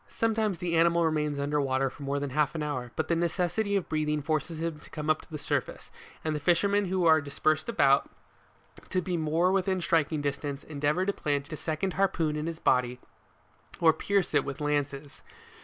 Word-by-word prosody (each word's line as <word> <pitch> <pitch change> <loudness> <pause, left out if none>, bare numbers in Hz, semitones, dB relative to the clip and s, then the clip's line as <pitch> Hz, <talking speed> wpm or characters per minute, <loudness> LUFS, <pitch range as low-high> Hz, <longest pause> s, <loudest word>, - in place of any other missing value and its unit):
Sometimes 220 -4 0
the 175 -1 -2
animal 170 0 +4
remains 150 -2 0
under 145 +1 0
water 135 -1 0
more 140 0 -2
than 140 -1 -4
half 150 +3 +1
an 155 - -2
hour; 130 -5 -3
but - - -1
the 170 - +2
necessity 175 +4 0
of 195 - 0
breathing 150 -1 -1
forces 155 +1 -2
him 165 -2 -3
to - - -15
come 150 -2 -6
to 155 - 0
the 155 - -5
surface, - - -3 0.3
and 155 -1 0
the - - -2
fishermen 200 +6 +2
who 185 -1 0
are 160 -2 +6
dispersed 155 +4 0
about, 140 -10 +3 0.8
to 185 - +1
be 180 0 -2
more 165 +3 +1
within 190 -1 +1
striking 165 -3 +1
distance, 140 0 -3
endeavour 150 +4 0
to 200 - 0
plant 145 -2 -2
a - - -2
second 160 +5 -2
harpoon 170 -5 +1
in 150 +1 -3
his 165 -1 -4
body 125 -4 +1 0.8
or 160 -1 +5
pierce 195 +2 0
it 145 -2 +4
with 140 -1 -6
lances. 145 -1 -2
155 Hz, 190 wpm, -28 LUFS, 145-175 Hz, 0.8 s, are